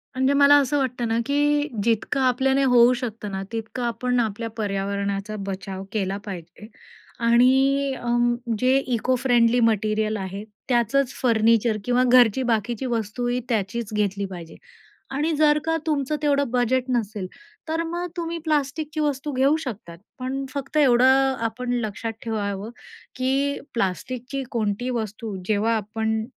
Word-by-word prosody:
म्हणजे 265 +2 +2
मला 285 0 +6
असं 280 +2 0
वाटतं 250 -3 -1
ना 225 +1 0
की 290 +1 +2 0.2
जितकं 230 +4 0
आपल्याने 265 +2 +2
होऊ 250 -1 +6
शकतं 230 -4 -5
ना, 190 0 -3
तितकं 225 +2 -4
आपण 245 +1 0
आपल्या 225 0 -2
पर्यावरणाचा 200 0 -2
बचाव 190 0 -5
केला 195 -2 -1
पाहिजे. 185 +2 -9 0.5
आणि 265 +4 +3
अं, 240 0 +1 0.2
जे 255 +1 +3 0.2
इको-फ्रेंडली 245 0 +2
मटेरिअल 215 -1 +1
आहे, 195 +1 -5 0.3
त्याचंच 250 +2 +2
फर्निचर 230 -2 +3
किंवा 245 +1 +3
घरची 245 0 +5
बाकीची 235 +1 -1
वस्तूही 240 +1 -1
त्याचीच 215 0 -2
घेतली 200 -1 0
पाहिजे. 175 -4 -9 0.6
आणि 300 +4 0
जर 300 -1 +4
का 325 0 +1
तुमचं 300 -1 0
तेवढं 285 -3 +2
बजेट 250 +1 +1
नसेल, 215 -6 -2 0.4
तर 325 +1 -1
मग 345 +2 -3
तुम्ही 335 0 -3
प्लास्टिकची 305 +1 -1
वस्तू 290 0 -1
घेऊ 270 +3 +3
शकतात, 190 -8 -7 0.2
पण 270 +2 -3
फक्त 280 +1 -4
एवढं 265 0 +5
आपण 245 +2 -4
लक्षात 220 +1 -4
ठेवावं 205 -2 -3 0.5
की 270 +2 0
प्लास्टिकची 250 +6 -3
कोणती 220 +1 -1
वस्तू 220 -3 -4
जेव्हा 220 +2 +2
आपण 220 +1 -2
240 Hz, 135 wpm, -23 LUFS, 215-270 Hz, 0.6 s, मला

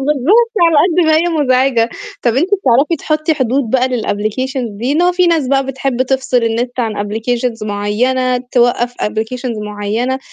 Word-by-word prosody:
بالضبط 385 - +2
على 330 - +2
قد 340 +3 +3
ما 315 0 +4
هي 320 - +3 0.2
مزعجة 255 -3 +2 0.3
طَب 235 -2 +1
أنت 330 +7 +1
بتعرفي 295 -2 +2
تحطّي 310 +2 0
حدود 260 -3 -1
بقى 260 0 +2
للapplications 240 +2 -2
دي 250 +5 -1
إن 330 +4 +2
هو 360 - +3
في 360 0 +2
ناس 325 -6 +1
بقى 270 0 +1
بتحب 265 -1 -1
تفصِل 260 -2 0
النت 240 +2 -2
عن 225 -3 -2
applications 225 +1 -2
معيّنة 250 +5 0 0.2
توقّف 240 0 +2
applications 225 +1 -3
معيّنة 210 +5 -2
255 Hz, 165 wpm, -15 LUFS, 230-280 Hz, 0.3 s, ما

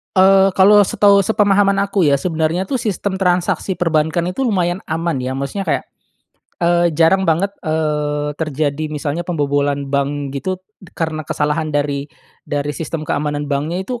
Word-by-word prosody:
Eee, 190 0 +5
kalau 200 +2 +6
setahu 200 0 +4
sepemahaman 205 -2 +3
aku 200 -3 +1
ya 145 - +4
sebenarnya 165 +2 -1
tuh 265 - 0
sistem 200 -3 -2
transaksi 180 0 0
perbankan 165 0 0
itu 260 +9 -2
lumayan 180 -5 0
aman 165 -1 -2
ya 130 0 -3
maksudnya 140 +9 -4
kayak, 155 - 0 0.8
eee, 175 0 +3
jarang 170 +2 +3
banget, 190 +5 +1
eee, 150 -2 -1
terjadi 155 0 -2
misalnya 150 +3 -4
pembobolan 145 -3 0
bank 140 0 -1
gitu 185 +7 -3 0.4
karena 160 -1 -2
kesalahan 150 +1 -1
dari 145 -1 -2 0.4
dari 145 0 -2
sistem 155 +1 -5
keamanan 145 0 -2
banknya 150 +6 -2
itu 245 +2 -5
160 Hz, 145 wpm, -18 LUFS, 145-190 Hz, 0.8 s, kalau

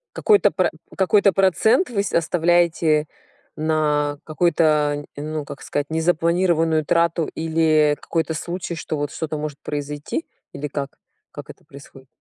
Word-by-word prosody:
Какой-то 420 -2 +4
про - - +1 0.3
какой-то 200 +1 +3
процент 195 - +3
вы 215 -4 -1 0.2
оставляете 165 -2 +2 0.5
на 150 -2 0
какую-то, 155 -3 +1
ну, 150 +1 -4
как 140 - -10
сказать, 145 0 -2
незапланированную 165 0 +1
трату 170 +1 +1
или 155 -2 +2
какой-то 165 -1 -2
случай, 175 +2 -4
что 155 -1 -4
вот, 145 -1 -3
что-то 155 -1 -4
может 150 -1 -5
произойти? 145 - -4 0.3
Или 150 - -5
как? 140 -1 -5 0.3
Как - - -9
это - - -14
происходит? 135 -1 -15
160 Hz, 130 wpm, -21 LUFS, 150-170 Hz, 0.5 s, Какой-то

